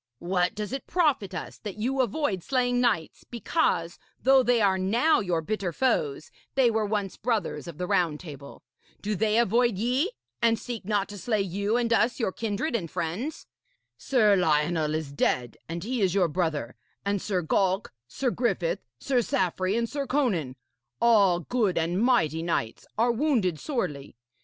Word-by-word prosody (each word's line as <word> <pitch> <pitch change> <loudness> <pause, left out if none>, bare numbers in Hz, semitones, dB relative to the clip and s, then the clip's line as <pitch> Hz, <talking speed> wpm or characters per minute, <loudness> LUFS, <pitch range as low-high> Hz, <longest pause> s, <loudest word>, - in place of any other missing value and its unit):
'What 180 - 0
does 210 +3 -4
it 270 - -5
profit 280 - +1
us 180 - -6
that 205 -2 -7
you 260 +5 0
avoid 240 - -1
slaying 245 +2 +1
knights 215 -10 0
because, 235 - -1 0.2
though 265 +1 +5
they 245 -1 +3
are 195 -3 +3
now 235 +12 +3
your 180 -5 0
bitter 200 -1 -2
foes, 155 - 0 0.2
they 255 -3 +4
were 220 -1 0
once 205 -3 -2
brothers 225 -5 -2
of 165 -3 -8
the 180 - -2
Round 165 -4 +1
Table? 145 -5 -10 0.4
Do 210 +1 -1
they 215 +2 +1
avoid 235 -1 +3
ye, 250 - +1 0.3
and 230 -1 +3
seek 230 -2 -6
not 205 -1 0
to 205 -1 -8
slay 215 -1 0
you 200 +4 -1
and 235 -1 +1
us 230 +3 +2
your 225 -5 0
kindred 225 +7 -2
and 175 -8 -2
friends? 200 - -4 0.5
Sir 215 -6 +3
Lionel 155 -2 +1
is 155 -3 -3
dead, 125 -4 0
and 170 +1 -4
he 245 +2 -2
is 190 -1 +2
your 185 -3 +4
brother; 155 -7 -2 0.3
and 200 -1 0
Sir 185 -4 -1
Galk, 190 +4 +1 0.2
Sir 250 - -1
Griffith, 230 -10 0 0.2
Sir 250 - +1
Saffre 185 -1 0
and 235 0 0
Sir 280 +2 -4
Conan 190 - 0 0.4
all 200 -7 +4
good 205 -2 0
and 170 +4 0
mighty 225 -11 +2
knights 140 -10 -2
are 235 +2 +3
wounded 230 - +1
sorely. 145 - -3
205 Hz, 170 wpm, -27 LUFS, 175-240 Hz, 0.5 s, though